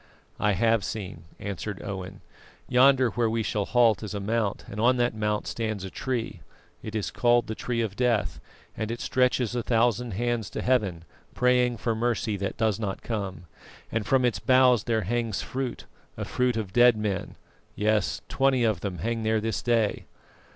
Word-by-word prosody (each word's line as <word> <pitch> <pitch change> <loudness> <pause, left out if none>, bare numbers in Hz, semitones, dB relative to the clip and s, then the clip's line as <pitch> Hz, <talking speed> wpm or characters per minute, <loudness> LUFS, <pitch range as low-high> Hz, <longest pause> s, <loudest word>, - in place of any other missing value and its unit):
"I 105 -1 +2
have 115 0 +2
seen," 95 -7 -6
answered 100 0 -5
Owen. 95 -1 -6 0.5
"Yonder 130 -1 +5
where 115 +1 +1
we 115 0 0
shall 105 -1 -1
halt 115 -2 +3
is 105 -1 -5
a - - -2
mount, 105 0 -1
and 105 +2 -5
on 125 +2 +4
that 120 0 +1
mount 105 -1 -1
stands 110 -4 -3
a 95 - -6
tree; 125 -4 -3 0.4
it 110 0 -7
is 105 - -2
called 120 +4 +3
the 110 - -4
Tree 115 +1 -2
of 105 -4 -3
Death, 105 - 0 0.4
and 110 -1 -3
it 120 +1 -4
stretches 125 -2 +1
a 120 - -1
thousand 120 0 +1
hands 120 -1 -1
to - - -5
Heaven, 100 -10 +1 0.3
praying 125 -1 +3
for 115 +1 -1
mercy 110 -1 -1
that 100 0 -3
does 110 -2 +1
not 100 -3 -4
come, 100 -5 -4 0.5
and 115 -1 -1
from 130 +4 +2
its 120 - +1
boughs 130 -3 +4
there 115 -2 +1
hangs 115 0 -1
fruit, 130 -2 -4 0.3
a - - -3
fruit 125 -2 0
of 100 -4 -4
dead 120 0 +6
men 105 -3 -3 0.4
yes, 105 -1 +1
twenty 135 -2 +2
of 110 -6 +1
them 95 -3 -4
hang 115 +6 -2
there 110 0 +1
this 110 +1 -2
day." 115 -3 +1
115 Hz, 180 wpm, -26 LUFS, 105-120 Hz, 0.5 s, dead